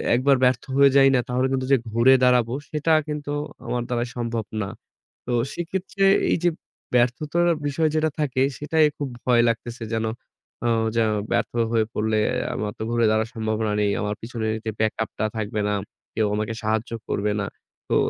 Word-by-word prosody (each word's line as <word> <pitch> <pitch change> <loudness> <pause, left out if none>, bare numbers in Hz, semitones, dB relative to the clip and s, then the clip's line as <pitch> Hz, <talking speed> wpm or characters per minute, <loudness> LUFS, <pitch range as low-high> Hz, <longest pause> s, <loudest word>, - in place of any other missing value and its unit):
একবার 135 +3 +4
ব্যর্থ 125 -2 +3
হয়ে 140 0 +7
যাই 135 -1 +7
না - - +4
তাহলে 125 +1 +1
কিন্তু 130 -1 0
যে 135 - +7
ঘুরে 115 +4 +5
দাঁড়াব 125 -2 +4 0.2
সেটা 155 +1 +1
কিন্তু 150 -1 -4 0.3
আমার 120 -1 -1
দ্বারা 120 -1 0
সম্ভব 115 -2 -2 0.2
না। 100 - -3 0.6
তো - - -2 0.2
সেক্ষেত্রে 190 +3 -2 0.3
এই - - +3
যে 175 - +5 0.5
ব্যর্থতার 150 +8 +2 0.2
বিষয় 155 +3 +1
যেটা 155 0 +2
থাকে 130 -4 0 0.2
সেটাই 155 +1 +2
খুব 145 -2 -3 0.2
ভয় 120 -2 +5
লাগতেছে। 115 +1 -4
যেন 110 0 0 0.6
অ - - +3 0.3
যেন 115 -1 +3 0.2
ব্যর্থ 120 0 0 0.2
হয়ে 115 -1 +2
পড়লে 110 0 +1 0.3
আমার 105 -1 -3
তো - - -4
ঘুরে 120 -1 +2
দাঁড়ানো 110 +1 +1
সম্ভাবনা 110 -1 -1
নেই। 105 -1 +2
আমার 105 0 -2
পিছনে 115 -1 -4 0.2
যে 110 - -1
ব্যাক 110 0 +2
আপ - - -8
টা 110 - +1
থাকবে 105 0 -2
না, - - +1 0.4
কেউ 110 -1 +2
আমাকে 110 +2 -2
সাহায্য 110 +2 -1 0.2
করবে 105 +1 0
না। - - -2 0.4
তো - - +2
120 Hz, 180 wpm, -24 LUFS, 110-140 Hz, 0.6 s, হয়ে